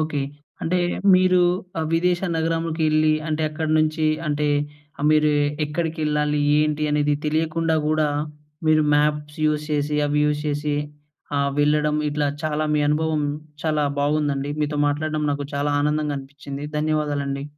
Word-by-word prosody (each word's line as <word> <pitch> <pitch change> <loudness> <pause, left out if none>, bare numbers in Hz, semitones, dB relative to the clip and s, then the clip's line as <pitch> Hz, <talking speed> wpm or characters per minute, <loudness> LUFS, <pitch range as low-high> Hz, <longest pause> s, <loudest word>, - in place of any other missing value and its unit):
Okay. 155 -2 -1 0.4
అంటే 180 +2 +1 0.4
మీరు 185 0 +4 0.4
ఆ - - 0
విదేశ 175 +1 +2 0.2
నగరంకు 165 0 -1
ఎళ్లి, 155 0 +3 0.2
అంటే 155 0 -1
అక్కడి 155 0 -2
నుంచి 155 0 +1 0.2
అంటే 150 0 0 0.6
మీరు 155 0 +4 0.3
ఎక్కడికి 160 +2 -3
ఎళ్ళాలి, 150 0 +1 0.2
ఏంటి 150 0 +1
అనేది 150 0 +2
తెలియకుండా 160 +1 0
కూడ, 155 0 +1 0.7
మీరు 155 0 +4
మ్యాప్స్ 150 0 0
యూజ్ 150 0 0
చేసి 150 0 0
అవి 150 0 +1
యూజ్ 150 0 +1
చేసి, 145 0 -1 0.6
ఆ! - - +2 0.2
వెళ్ళడం 150 +1 +2
ఇట్లా 150 0 0 0.2
చాలా 155 0 -1
మీ 150 - +2
అనుభవం 155 0 +1 0.4
చాలా 155 -2 +1 0.2
బాగుందండి. 145 -1 0
మీతో 150 0 -1
మాట్లాడడం 155 +1 -1
నాకు 140 0 -3
చాలా 145 +1 0
ఆనందంగా 150 -1 0
అనిపించింది. 140 +1 -8
ధన్యవాదాలండి. 145 -2 -1
150 Hz, 135 wpm, -23 LUFS, 145-155 Hz, 0.7 s, మీరు